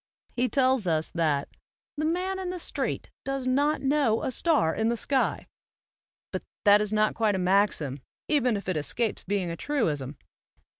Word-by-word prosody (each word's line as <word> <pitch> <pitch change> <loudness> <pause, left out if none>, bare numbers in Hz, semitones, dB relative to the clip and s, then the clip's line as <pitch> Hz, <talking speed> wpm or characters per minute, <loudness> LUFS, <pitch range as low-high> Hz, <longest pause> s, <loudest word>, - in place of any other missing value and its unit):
He 250 +1 +1
tells 260 -6 +2
us 160 -1 0
that 155 -4 0 0.3
" - - -72
the 305 0 -1
man 365 +4 -1
in 370 -1 -3
the 365 - -4
street 345 - -3
does 270 -1 -3
not 285 +4 +2
know 270 -5 +2
a - - -1
star 285 - +2
in 220 +1 0
the 235 - 0
sky"; 270 +3 0 0.9
but - - -3 0.2
that 205 0 +7
is 210 -1 -1
not 215 0 +2
quite 215 -3 +1
a - - 0
maxim, 180 -7 +1 0.3
even 250 -7 +2
if 200 - -8
it 185 -4 0
escapes 220 +9 -1
being 190 -3 -1
a - - -4
truism. 155 - -2
220 Hz, 180 wpm, -27 LUFS, 180-280 Hz, 0.9 s, that